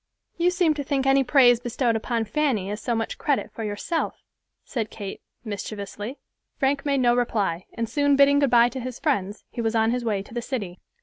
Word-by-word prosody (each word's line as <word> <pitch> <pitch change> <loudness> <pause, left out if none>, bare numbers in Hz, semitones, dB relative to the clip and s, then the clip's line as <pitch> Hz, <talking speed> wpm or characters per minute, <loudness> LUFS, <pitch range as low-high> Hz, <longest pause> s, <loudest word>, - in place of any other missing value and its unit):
"You 345 +1 +3
seem 355 -3 +2
to 290 -1 -4
think 270 -1 -1
any 270 0 +4
praise 245 -3 +5
bestowed 240 -1 0
upon 225 0 -1
Fanny 220 -6 0
as 210 +1 -5
so 240 +1 -1
much 225 0 -3
credit 285 -2 0
for 225 - -6
yourself," 210 +11 -3 0.4
said 225 -5 -3
Kate, 200 -3 -7 0.2
mischievously. 205 +3 -5 0.4
Frank 275 +1 0
made 275 -2 +2
no 240 -1 +4
reply, 205 -8 -1
and 230 -1 -2
soon 285 +2 +2
bidding 280 +1 +5
good 280 -2 +3
by 235 0 +6
to 260 - -6
his 255 -1 -5
friends, 205 - -1
he 240 - -4
was 225 0 0
on 225 0 +3
his 245 0 -1
way 210 -4 -1
to 205 - -15
the 240 - -2
city. 205 -9 -4
240 Hz, 205 wpm, -25 LUFS, 220-275 Hz, 0.4 s, by